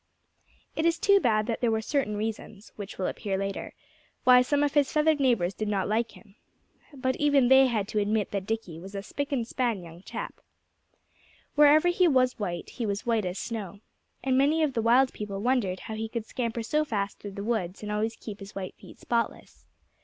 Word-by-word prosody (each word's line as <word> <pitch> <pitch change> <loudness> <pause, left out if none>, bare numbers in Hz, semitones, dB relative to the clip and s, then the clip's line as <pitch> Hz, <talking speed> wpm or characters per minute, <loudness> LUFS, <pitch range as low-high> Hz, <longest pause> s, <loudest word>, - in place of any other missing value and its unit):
It 315 - 0
is 335 0 +3
too 400 0 +5
bad 215 - +2
that 230 -1 -3
there 240 - +3
were 220 0 +1
certain 220 -2 -1
reasons 215 -1 -5
which 200 -2 -8
will 185 - -2
appear 195 0 -2
later 195 0 -4 0.5
why 250 0 +7
some 285 +3 +1
of 290 - +1
his 290 -2 +3
feathered 305 0 +3
neighbors 230 -9 +2
did 215 - -4
not 200 -2 0
like 225 +2 0
him. 205 -3 -17 0.6
But 260 -2 -2
even 285 -4 +3
they 265 0 +7
had 215 -5 -1
to 215 - 0
admit 210 0 0
that 200 -1 -3
Dickie 220 -8 -3
was 195 +3 -10
a 195 - -4
spick 285 +7 -4
and 245 -5 -1
span 235 -7 -1
young 170 +1 -12
chap. - - -7 1.1
Wherever 300 +3 +6
he 355 0 +3
was 255 -5 +2
white 175 -5 -4
he 240 - -4
was 200 0 -3
white 225 -4 +1
as 180 +1 -3
snow. 205 -4 -5 0.4
And 265 -1 +2
many 305 +4 +3
of 290 -3 +1
the 230 - 0
wild 250 +4 +4
people 200 -2 -5
wondered 210 -5 0
how 220 - -7
he 220 +1 -4
could 230 -1 -4
scamper 230 -1 -3
so 300 +7 +1
fast 200 -8 -3
through 205 -1 -8
the 200 - -5
woods 205 -4 -2
and 210 - -4
always 220 +2 -1
keep 210 -3 -8
his 200 0 -11
white 190 -1 -5
feet - - -14
spotless. 235 -1 -3
225 Hz, 210 wpm, -28 LUFS, 200-265 Hz, 1.1 s, why